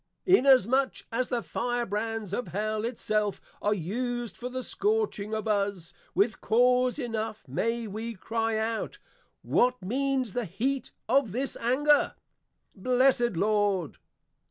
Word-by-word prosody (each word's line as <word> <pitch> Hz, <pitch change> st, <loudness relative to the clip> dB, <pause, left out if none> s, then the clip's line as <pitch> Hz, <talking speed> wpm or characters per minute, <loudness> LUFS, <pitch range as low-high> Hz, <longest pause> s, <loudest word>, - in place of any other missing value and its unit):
_ 370 Hz, -, +8 dB
Inasmuch 265 Hz, 0 st, +3 dB
as 245 Hz, +2 st, -1 dB
the 240 Hz, -2 st, -1 dB
Fire 240 Hz, 0 st, -1 dB
brands 215 Hz, -1 st, -3 dB
of 245 Hz, +3 st, -2 dB
Hell 215 Hz, +2 st, -2 dB
it 235 Hz, 0 st, -3 dB
self 210 Hz, -2 st, 0 dB, 0.2 s
are 210 Hz, +1 st, +2 dB
used 240 Hz, +5 st, -3 dB
for 250 Hz, -, -6 dB
the 255 Hz, 0 st, -4 dB
scorching 415 Hz, -, -1 dB
of 215 Hz, +1 st, -3 dB
us, 200 Hz, -5 st, -1 dB, 0.2 s
with 205 Hz, +5 st, +2 dB
cause 250 Hz, +2 st, +3 dB
enough 225 Hz, -, -4 dB
may 230 Hz, -, -1 dB
we 220 Hz, +3 st, -5 dB
cry 225 Hz, +2 st, -1 dB
out, 220 Hz, 0 st, -2 dB, 0.5 s
What 250 Hz, 0 st, +2 dB
means 260 Hz, +1 st, 0 dB
the 245 Hz, -2 st, -1 dB
heat 245 Hz, +9 st, -2 dB, 0.2 s
of 250 Hz, -4 st, +2 dB
this 265 Hz, +3 st, -2 dB
anger? 290 Hz, +5 st, +3 dB, 0.6 s
Blessed 250 Hz, +2 st, +3 dB
Lord! 205 Hz, -4 st, +1 dB
230 Hz, 135 wpm, -28 LUFS, 210-255 Hz, 0.6 s, _